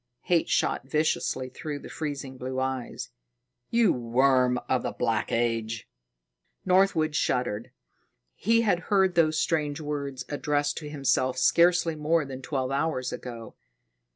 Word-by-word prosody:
Hate 175 -2 +1
shot - - +1
viciously 150 -4 0
through 145 +3 -5
the - - -10
freezing 140 -4 -5
blue 130 +1 -4
eyes. 130 -2 -3 0.6
"You 230 -4 +4
worm 125 +1 +2
of 130 -1 +1
the - - -3
Black 115 -2 -1
Age!" 115 -2 -1 0.8
Northwood 180 -5 +3
shuddered. 120 -6 0 0.6
He 230 +3 +2
had 200 -6 +2
heard 190 -3 +3
those 155 -2 +3
strange 150 -3 0
words 140 -4 -4
addressed 145 0 -1
to 150 -2 -8
himself 130 -3 +1
scarcely 170 +3 +4
more 155 +1 +1
than 135 -1 -7
twelve 130 -1 -2
hours 135 -3 -1
ago. 115 -3 -8
140 Hz, 130 wpm, -27 LUFS, 130-160 Hz, 0.8 s, You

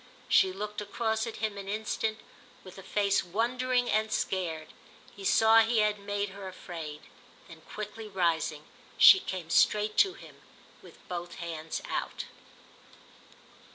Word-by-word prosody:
She 190 - +4
looked 210 +2 -5
across 220 +2 -1
at 230 - -6
him 215 -2 -3
an 195 - -8
instant 220 +1 -2 0.5
with 185 0 -12
a - - -8
face 200 +1 +1
wondering 245 +6 0
and 215 +1 +1
scared; 165 -5 -2 0.5
he 200 - -10
saw 225 +3 +6
he 225 +1 +3
had 210 -1 +2
made 205 0 -3
her 195 0 -9
afraid. 165 -5 -8 0.5
Then 165 -1 -13
quickly 215 +1 -6
rising 165 -5 0 0.3
she 385 - +9
came 180 - -6
straight 210 0 +3
to 385 -1 +4
him - - -14 0.4
with - - -17
both 175 -1 -5
hands 165 -2 -5
out. - - -3
205 Hz, 140 wpm, -29 LUFS, 180-220 Hz, 0.5 s, she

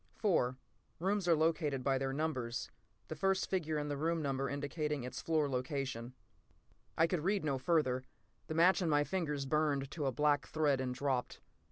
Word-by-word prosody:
li> 175 - +3 0.5
Rooms 195 +1 0
are 170 - +6
located 155 -4 +1
by 135 0 +2
their 135 0 -1
numbers: 135 -5 -2 0.4
the - - -5
first 195 0 +1
figure 160 -5 0
in 150 0 -2
the 145 - -2
room 165 +3 0
number 135 -2 -1
indicating 145 0 -2
its 125 - -5
floor 155 -3 +1
location. 130 -2 -2
</blockquote> 130 +1 -24
I 160 - +5
could 165 -2 -1
read 195 -1 +1
no 140 -3 0
further. 130 -4 +1 0.4
The 155 - -4
match 180 +4 +5
in 170 - +1
my 145 -1 +4
fingers 150 -5 -2
burned 145 -1 +1
to 150 -4 -2
a - - +1
black 145 +1 +2
thread 145 -4 +1
and 130 -1 -2
dropped. 130 -2 -1
150 Hz, 185 wpm, -35 LUFS, 135-165 Hz, 0.5 s, are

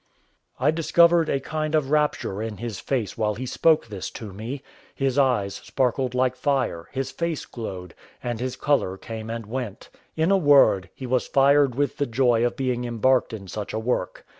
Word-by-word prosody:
I 140 +4 +3
discovered 170 +1 +4
a 140 - +1
kind 155 +2 -2
of 145 -3 0
rapture 150 -9 0
in 110 -2 -4
his 115 -4 -5
face 120 -5 -2
while 105 -1 +1
he 130 +4 -5
spoke 160 +5 +3
this 100 -5 -6
to 105 -4 -8
me; 120 +8 -6 0.3
his 135 0 0
eyes 120 -8 +2
sparkled 130 -1 0
like 130 0 +2
fire; 130 - -1
his 135 0 -3
face 170 -2 -3
glowed, 95 -7 -7 0.3
and 120 -2 -3
his 130 +1 -3
colour 135 -10 0
came 110 +1 -7
and 115 -1 -4
went; 115 -2 -6 0.2
in 160 +4 +2
a 195 - +5
word, 140 - +5
he 130 - -7
was 125 0 0
fired 140 -1 +4
with 145 +1 -1
the 145 - 0
joy 120 -1 +2
of 120 - 0
being 125 -2 -1
embarked 125 +2 +2
in 100 -4 -7
such 105 +2 -5
a 110 - -1
work. 120 +3 -2
125 Hz, 190 wpm, -24 LUFS, 110-140 Hz, 0.3 s, a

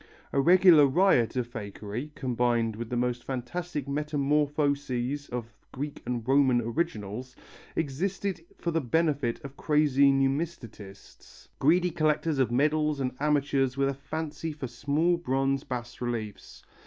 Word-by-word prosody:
A 140 - +3
regular 175 -2 +7
riot 135 -7 +3
of 125 -1 0
fakery, 110 +3 -6
combined 120 -3 0
with 115 +1 -6
the 125 - -2
most 125 0 -1
fantastic 140 +4 -4
metamorphoses 145 -2 0
of 120 -1 -5 0.2
Greek 145 +2 -5
and 120 -2 -3
Roman 135 -2 +4
originals, 120 -2 -3 0.4
existed 180 +4 -2
for 170 - -2
the 165 0 0
benefit 145 -3 0
of 135 0 -9
crazy 145 -2 +3
numismatists, 135 - -4
greedy 175 +5 +3
collectors 155 -2 +1
of 130 -3 +3
medals 150 +3 +1
and 130 -1 -1
amateurs 140 -3 +1
with 140 0 +2
a - - -1
fancy 155 +3 -5
for 145 -3 -6
small 145 +8 0
bronze 135 -3 0
bas 120 -1 -6
reliefs. 115 -4 -5
140 Hz, 130 wpm, -28 LUFS, 125-155 Hz, 0.4 s, regular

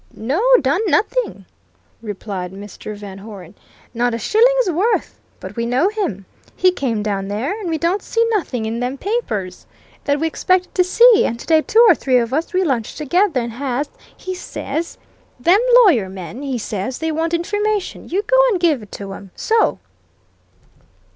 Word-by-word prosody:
"No 270 - -1 0.2
done 285 +9 +1
nothing," - - 0 0.6
replied 200 -4 -5
Mr. 205 +1 -8
Van 200 -2 -9
Hoeren. 195 -4 -11 0.4
"Not 240 0 0
a - - -2
shilling's 475 - +3
worth. 390 +8 0 0.2
But - - -9
we 235 -1 -2
know 260 +10 +2
him. 370 - -3 0.3
He 370 - +4
came 235 -11 -2
down 200 -2 -2
there. 215 - -2
And 385 -5 -4
we 320 - 0
don't 345 +5 0
see 460 +3 0
nothing 270 - -1
in 225 +1 -3
them 250 +3 -3
papers 225 - -3 0.4
that 285 0 +1
we 320 - 0
expected 365 +3 0
to 365 - +3
see, 465 +5 +6
and 235 - -4
today 320 +3 +3
two 455 +8 +4
or 385 - +8
three 260 -5 +1
of 235 0 0
us, 315 +4 -1
we 370 0 +1
lunch 255 -9 -1
together, 310 0 +1
and 235 0 -4
Haas, 270 +3 -3 0.3
he 370 - -5
says: 330 -2 -5 0.4
'Them 350 +10 +4 0.3
lawyer 235 - +3
men,' 190 +6 -8
he 270 -3 -3
says, 220 +2 -4
'they 320 0 -2
want 325 +2 -1
information. 415 +3 -2
You 390 +4 0
go - - +2
and 395 -6 0
give 320 -8 +2
it 210 - -14
to 195 -1 -7
'em. 195 0 -10
So!" 450 0 +1
285 Hz, 175 wpm, -19 LUFS, 220-370 Hz, 0.6 s, or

